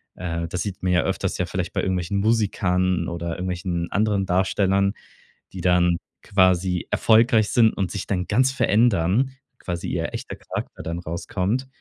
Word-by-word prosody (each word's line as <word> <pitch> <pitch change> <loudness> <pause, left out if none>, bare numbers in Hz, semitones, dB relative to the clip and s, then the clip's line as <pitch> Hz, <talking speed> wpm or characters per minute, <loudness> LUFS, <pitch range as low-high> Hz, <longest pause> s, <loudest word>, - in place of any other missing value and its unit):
äh, 85 -2 -3
das 90 - -2
sieht 100 -3 -6
man 90 - +1
ja 90 -2 +3
öfters - - -2
ja - - 0
vielleicht - - -3
bei - - 0
irgendwelchen 95 +1 -1
Musikern 95 -5 +1
oder 85 0 -4
irgendwelchen 90 -1 -3
anderen 100 -1 +1
Darstellern, 95 +1 +1 0.6
die 95 - -6
dann 90 -1 +3 0.3
quasi 95 -2 +2
erfolgreich 110 -1 +4
sind 115 -2 +5
und 95 -2 -1
sich 100 - -4
dann 90 -2 -1
ganz 130 +1 +3
verändern, 115 - +2 0.3
quasi 85 -1 -4
ihr - - -2
echter - - -6
Charakter - - -7
dann 85 +1 -4
rauskommt. 95 +8 -2
95 Hz, 160 wpm, -23 LUFS, 90-105 Hz, 0.6 s, sind